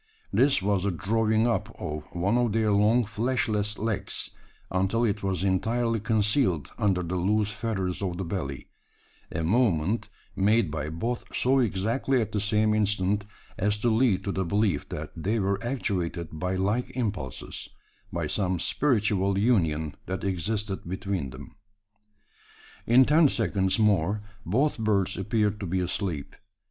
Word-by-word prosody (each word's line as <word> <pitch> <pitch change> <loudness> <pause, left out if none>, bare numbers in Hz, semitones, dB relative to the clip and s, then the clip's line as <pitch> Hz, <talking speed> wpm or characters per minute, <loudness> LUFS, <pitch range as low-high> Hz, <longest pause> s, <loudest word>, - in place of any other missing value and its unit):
This 135 -6 +4
was 100 -1 +2
the 100 - +1
drawing 110 +5 +1
up 120 - -1
of 75 -1 -4
one 95 +6 +1
of 120 -3 +2
their 110 -1 +2
long 105 +4 +4
fleshless 105 -1 0
legs, 105 -3 -2 0.4
until 95 +6 +1
it 105 -2 -1
was 95 -2 -1
entirely 115 +5 +1
concealed 105 - +1
under 95 -3 +2
the 85 +2 -2
loose 105 +3 +1
feathers 100 -4 -2
of 90 -3 -2
the 95 - -2
belly 85 -7 -4 0.6
a 80 - -2
movement 100 0 +1 0.3
made 100 -3 +3
by 75 -1 -3
both 115 +10 -4
so 135 +2 +3
exactly 115 +4 +1
at 110 -2 -2
the 105 - 0
same 105 +1 +2
instant, 105 -1 +1 0.3
as 105 +1 +2
to 115 +3 +1
lead 110 -4 +2
to 100 - -2
the 95 - -1
belief 95 -3 0
that - - -5
they 100 +8 -1
were 100 +1 0
actuated 90 -9 -2
by 90 +4 -2
like 105 +7 -1
impulses, 100 - -4 0.4
by 85 -2 -2
some 90 +3 0
spiritual 100 - +1
union 80 - +1
that 95 0 -3
existed 100 +1 -1
between 95 -6 -2
them! 65 +1 -11 1.3
In 125 +3 +7
ten 150 +1 +5
seconds 100 -5 +1
more 105 -1 +2 0.2
both 135 - +1
birds 100 -4 +1
appeared 105 +1 0
to 100 - -4
be 95 +2 0
asleep. 90 -4 -3
100 Hz, 150 wpm, -27 LUFS, 95-110 Hz, 1.3 s, In